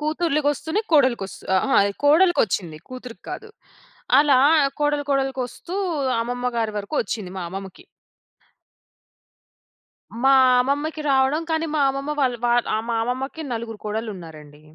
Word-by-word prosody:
కూతుర్లు 305 Hz, 0 st, 0 dB
కొస్తూనే 315 Hz, +7 st, 0 dB
కోడలికొస్తు 255 Hz, -9 st, +2 dB
అహా! 275 Hz, +7 st, 0 dB
అది 200 Hz, 0 st, 0 dB
కోడలికొచ్చింది. 285 Hz, -, +3 dB
కూతురికి 250 Hz, -2 st, -10 dB
కాదు. 440 Hz, -, -7 dB, 0.7 s
అలా 285 Hz, -3 st, +5 dB, 0.4 s
కోడలు 295 Hz, -1 st, 0 dB
కోడలుకొస్తూ 270 Hz, +4 st, -2 dB, 0.5 s
అమ్మమ్మ 245 Hz, +1 st, -2 dB
గారి 225 Hz, -2 st, -1 dB
వరకు 205 Hz, +9 st, -6 dB
వచ్చింది 200 Hz, -3 st, -5 dB
మా 185 Hz, -, -4 dB
అమ్మమ్మకి. 195 Hz, -, -8 dB, 2.4 s
మా 270 Hz, -, +6 dB, 0.3 s
అమ్మమ్మకి 290 Hz, +4 st, -1 dB
రావడం, 270 Hz, +4 st, +2 dB
కానీ 320 Hz, 0 st, 0 dB
మా 295 Hz, -, +2 dB
అమ్మమ్మ 275 Hz, +2 st, -3 dB
వాళ్ 250 Hz, -2 st, +1 dB
వా 240 Hz, -, +3 dB, 0.2 s
ఆ! -, -, +1 dB
మా 230 Hz, -, 0 dB
అమ్మమ్మకి 260 Hz, +6 st, -4 dB
నలుగురు 225 Hz, -2 st, -6 dB
కోడళ్ళున్నారండి. 170 Hz, -9 st, -7 dB
260 Hz, 120 wpm, -22 LUFS, 220-295 Hz, 2.4 s, మా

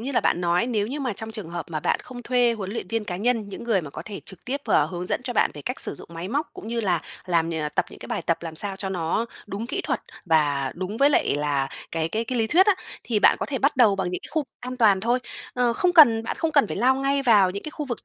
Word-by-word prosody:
như 270 Hz, +4 st, -4 dB
là -, -, +3 dB
bạn 175 Hz, -, +1 dB
nói 175 Hz, +5 st, +2 dB
nếu 215 Hz, -4 st, 0 dB
như 285 Hz, +5 st, -4 dB
mà 255 Hz, -5 st, -1 dB
trong 220 Hz, +2 st, -6 dB
trường 210 Hz, -6 st, -6 dB
hợp 170 Hz, -3 st, -5 dB
mà 155 Hz, -2 st, -2 dB
bạn -, -, +1 dB
không 245 Hz, -1 st, -9 dB
thuê 245 Hz, -1 st, +3 dB
huấn 200 Hz, -4 st, -5 dB
luyện 230 Hz, -, -5 dB
viên 225 Hz, +1 st, -1 dB
cá 180 Hz, -3 st, -4 dB
nhân, 225 Hz, 0 st, 0 dB
những 200 Hz, -, -7 dB
người 220 Hz, -6 st, +2 dB
mà 150 Hz, -3 st, -8 dB
có -, -, -7 dB
thể 205 Hz, -2 st, -7 dB
trực 190 Hz, -3 st, -10 dB
tiếp, 275 Hz, +3 st, -2 dB
ờ, 150 Hz, -, +3 dB
hướng 175 Hz, +2 st, -5 dB
dẫn -, -, -1 dB
cho 245 Hz, -, -2 dB
bạn 230 Hz, -, +3 dB
về 145 Hz, -, -8 dB
cách -, -, -4 dB
sử -, -, -4 dB
dụng -, -, -12 dB
máy 170 Hz, +3 st, -5 dB
móc 290 Hz, +7 st, -1 dB
cũng 220 Hz, -, -9 dB
như 235 Hz, 0 st, -1 dB
là 180 Hz, -6 st, +1 dB, 0.3 s
làm 170 Hz, -2 st, +1 dB
nh 165 Hz, -, -3 dB, 0.2 s
tập -, -, +2 dB
những -, -, -12 dB
cái -, -, -9 dB
bài -, -, -3 dB
tập 170 Hz, -, 0 dB
làm 160 Hz, -2 st, -6 dB
sao 195 Hz, +2 st, -4 dB
cho 195 Hz, 0 st, -4 dB
nó 180 Hz, +4 st, -1 dB, 0.2 s
đúng 210 Hz, +3 st, -4 dB
kỹ 275 Hz, -, -2 dB
thuật -, -, -2 dB, 0.2 s
và 145 Hz, -5 st, +2 dB
đúng 185 Hz, +4 st, -4 dB
với 280 Hz, +3 st, +5 dB
lại 205 Hz, -, +2 dB
là 140 Hz, -2 st, 0 dB, 0.2 s
cái 165 Hz, -1 st, 0 dB
cái 220 Hz, +7 st, -2 dB
cái 250 Hz, +1 st, -2 dB
lý 225 Hz, -, +2 dB
thuyết 370 Hz, -, +5 dB
á, 410 Hz, -, +5 dB, 0.3 s
thì 225 Hz, -3 st, +1 dB
bạn -, -, +6 dB
có -, -, -1 dB
thể 270 Hz, -, -2 dB
bắt 280 Hz, +2 st, +2 dB
đầu 220 Hz, -6 st, +5 dB
bằng 185 Hz, -2 st, -1 dB
những 180 Hz, -, -3 dB
cái -, -, -10 dB
khu 315 Hz, -2 st, 0 dB, 0.2 s
an 255 Hz, +1 st, -6 dB
toàn 210 Hz, -6 st, +4 dB
thôi. 240 Hz, +5 st, +2 dB, 0.4 s
Ơ, 245 Hz, -1 st, +2 dB
không 355 Hz, +8 st, +2 dB
cần 235 Hz, -9 st, +7 dB
bạn -, -, -4 dB
không 325 Hz, -1 st, 0 dB
cần 285 Hz, -6 st, +5 dB
phải -, -, -5 dB
lao 255 Hz, +5 st, +4 dB
ngay 275 Hz, +1 st, 0 dB
vào 210 Hz, -7 st, +5 dB
những 200 Hz, +2 st, -5 dB
cái 305 Hz, -, -6 dB
khu 300 Hz, -1 st, -5 dB
vực 240 Hz, -, -5 dB
215 Hz, 305 wpm, -24 LUFS, 180-250 Hz, 0.4 s, cần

